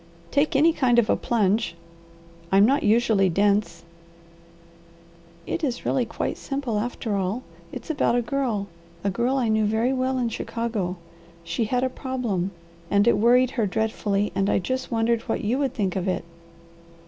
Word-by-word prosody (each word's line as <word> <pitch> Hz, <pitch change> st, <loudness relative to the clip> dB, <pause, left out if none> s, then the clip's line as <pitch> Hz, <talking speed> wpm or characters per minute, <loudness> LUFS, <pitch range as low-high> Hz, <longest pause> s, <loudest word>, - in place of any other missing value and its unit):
"Take 285 Hz, +1 st, +1 dB
any 320 Hz, +4 st, +5 dB
kind 250 Hz, -6 st, +2 dB
of 235 Hz, -2 st, +4 dB
a -, -, +4 dB
plunge. 215 Hz, -4 st, 0 dB, 0.8 s
I'm 195 Hz, +1 st, +6 dB
not 275 Hz, +5 st, +3 dB
usually 215 Hz, -3 st, +3 dB
dense." 200 Hz, -2 st, +1 dB, 1.6 s
"It 335 Hz, -, -3 dB
is 250 Hz, -4 st, -2 dB
really 255 Hz, -3 st, +1 dB
quite -, -, -3 dB
simple 270 Hz, -6 st, -2 dB
after 225 Hz, -1 st, -3 dB
all. 195 Hz, +6 st, -2 dB, 0.3 s
It's -, -, -5 dB
about 285 Hz, -5 st, +1 dB
a 245 Hz, -, +1 dB
girl 235 Hz, -6 st, -1 dB, 0.4 s
a 200 Hz, -, +1 dB
girl 240 Hz, +7 st, 0 dB
I 250 Hz, -3 st, +1 dB
knew 220 Hz, 0 st, +2 dB
very 220 Hz, +5 st, +1 dB
well 260 Hz, 0 st, 0 dB
in 245 Hz, -2 st, 0 dB
Chicago. 220 Hz, -5 st, -3 dB, 0.5 s
She 225 Hz, +6 st, -1 dB
had 250 Hz, +3 st, 0 dB
a -, -, +3 dB
problem 250 Hz, -8 st, -2 dB, 0.4 s
and 205 Hz, +2 st, +3 dB
it 235 Hz, -, +5 dB
worried 250 Hz, +3 st, +4 dB
her 225 Hz, -5 st, 0 dB
dreadfully, 205 Hz, 0 st, -1 dB
and 195 Hz, +1 st, 0 dB
I -, -, +3 dB
just 255 Hz, +8 st, -2 dB
wondered 230 Hz, 0 st, +1 dB
what -, -, -1 dB
you 235 Hz, +6 st, 0 dB
would 270 Hz, -3 st, -1 dB
think 195 Hz, -6 st, -1 dB
of 190 Hz, 0 st, -2 dB
it." 185 Hz, -, -1 dB
230 Hz, 170 wpm, -24 LUFS, 205-255 Hz, 1.6 s, I'm